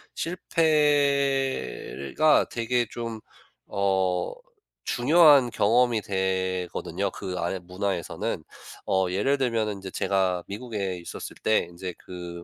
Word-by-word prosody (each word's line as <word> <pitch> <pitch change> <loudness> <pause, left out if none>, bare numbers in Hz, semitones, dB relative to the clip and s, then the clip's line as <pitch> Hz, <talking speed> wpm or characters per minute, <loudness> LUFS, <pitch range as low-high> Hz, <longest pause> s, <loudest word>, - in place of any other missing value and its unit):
실패가 140 - +1
되게 120 0 0
좀 115 -2 -5 0.5
어 95 -2 0 0.5
중요한 145 0 +5
경험이 115 +1 +3
되거든요, 95 -1 -2
그 90 -1 -6
안의 85 +2 -2
문화에서는. 90 0 -3 0.4
어 95 0 +2
예를 105 +10 +1
들면은 115 -5 0
인제 95 -1 -8
제가 95 -2 0
미국에 100 -3 -4
있었을 85 - -8
때 110 - +3
인제 90 +1 -6
그 85 -1 -8
100 Hz, 215 characters per minute, -26 LUFS, 90-125 Hz, 0.5 s, 중요한